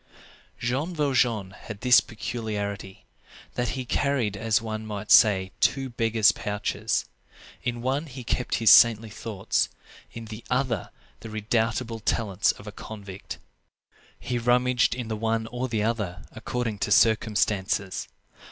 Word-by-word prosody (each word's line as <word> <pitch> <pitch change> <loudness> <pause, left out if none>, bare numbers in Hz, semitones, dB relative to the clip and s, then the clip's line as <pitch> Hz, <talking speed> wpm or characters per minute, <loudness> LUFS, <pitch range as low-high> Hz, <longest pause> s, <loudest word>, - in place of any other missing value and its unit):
Jean 135 +9 -2
Valjean 120 -9 +1
had 105 +1 -10
this 125 -1 +6
peculiarity, 105 -4 -5 0.5
that 125 +2 -2
he 130 - -4
carried, 125 -5 0
as 110 +2 +1
one 110 -1 -5
might 105 -1 -5
say, 95 -3 +6
two 135 -2 +1
beggar's 115 -2 +3
pouches: 105 0 -2 0.6
in 120 -1 -3
one 135 +5 -1
he 130 -2 -8
kept 125 +1 -1
his 115 -2 +5
saintly 115 -2 +6
thoughts; 105 -2 -1 0.4
in 115 -1 -8
the 110 +1 -9
other 125 -4 0 0.3
the 110 - -9
redoubtable 110 +1 -1
talents 105 -2 +1
of 100 - -14
a 105 - -7
convict. 100 -3 -9 0.8
He 125 -1 -2
rummaged 125 +1 +2
in 125 -3 -5
the 110 - -2
one 110 +1 -1
or 125 +1 -2
the 110 -4 -1
other, 105 -6 -2
according 115 -4 -3
to 105 - -2
circumstances. 105 -2 +2
115 Hz, 135 wpm, -26 LUFS, 105-125 Hz, 0.8 s, this